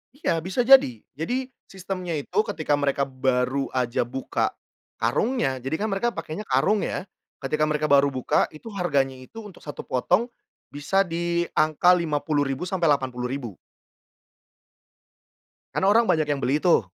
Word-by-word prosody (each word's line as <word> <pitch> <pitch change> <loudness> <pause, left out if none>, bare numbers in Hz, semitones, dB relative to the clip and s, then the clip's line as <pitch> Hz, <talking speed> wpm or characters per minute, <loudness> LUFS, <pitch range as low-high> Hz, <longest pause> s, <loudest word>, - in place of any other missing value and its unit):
Iya, 165 - -1
bisa 185 +6 -4
jadi. 260 - +6 0.2
Jadi 245 - -2 0.2
sistemnya 185 -4 -4
itu 180 +6 -8
ketika 155 -8 -1
mereka 140 -1 0
baru 130 0 0
aja 125 -2 0
buka 130 +3 -2 0.5
karungnya 135 - 0
jadikan 160 +11 -2
mereka 235 +4 0
pakainya 165 +4 -6
karung 195 +11 +2
ya, 185 - -4 0.3
ketika 155 +2 0
mereka 155 0 0
baru 140 0 +5
buka 130 -1 +1
itu 155 +9 -12
harganya 140 -8 0
itu 130 - -12
untuk 205 -5 -13
1 145 - -7
potong 180 - +1 0.4
bisa 145 +7 0
di 170 0 -1
angka 155 +4 +4
Rp50.000 150 -2 -1
sampai 175 -4 +1
Rp80.000. 125 -4 -2 2.2
Karena 190 - +1
orang 225 +4 +5
banyak 160 -6 +2
yang 145 -2 -1
beli 140 +4 +2
tuh. 170 - +4
155 Hz, 140 wpm, -24 LUFS, 135-185 Hz, 2.2 s, jadi